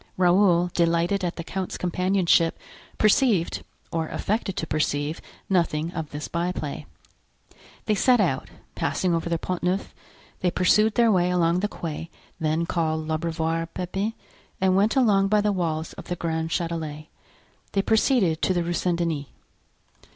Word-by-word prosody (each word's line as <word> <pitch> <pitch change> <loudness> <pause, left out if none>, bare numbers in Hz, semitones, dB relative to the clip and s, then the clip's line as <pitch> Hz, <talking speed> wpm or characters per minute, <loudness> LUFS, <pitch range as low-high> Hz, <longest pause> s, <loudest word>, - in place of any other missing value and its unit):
Raoul, 180 -1 +4
delighted 170 +3 +1
at 175 -1 -1
the 170 - -5
count's 185 +2 -4
companionship, 180 -2 +2 0.4
perceived, 215 -4 +2 0.3
or 165 -1 -1
affected 205 0 -2
to - - -1
perceive 150 0 -1 0.3
nothing 170 -3 +1
of 160 -3 -4
this 145 +1 -5
byplay. 170 -4 -3 1.0
They 215 - +2
set 245 +4 +4
out, 165 -10 0 0.2
passing 180 -2 0
over 165 0 -1
the 170 - +1
Pont 180 +2 -4
Neuf; 180 +3 -1 0.5
they 180 - +1
pursued 210 +5 +3
their 235 -2 +4
way 180 -2 +3
along 175 -1 +2
the 210 - 0
quay 165 -4 -6 0.3
then 160 +1 0
called 160 -2 -1
L'Abreuvoir 165 +1 -1
Pepin, 195 +4 -2 0.5
and 185 -1 +3
went 205 +5 +3
along 205 -7 +4
by 210 +1 +3
the 210 0 +2
walls 165 -4 -2
of - - -10
the 175 - -3
Grand 160 -1 -2
Chatelet. 160 -3 -3 0.7
They 195 - +2
proceeded 220 - +2
to 185 - +2
the 175 - +1
Rue 175 +1 -2
Saint 175 0 0
Denis. 160 -5 -2
175 Hz, 150 wpm, -25 LUFS, 165-195 Hz, 1.0 s, Raoul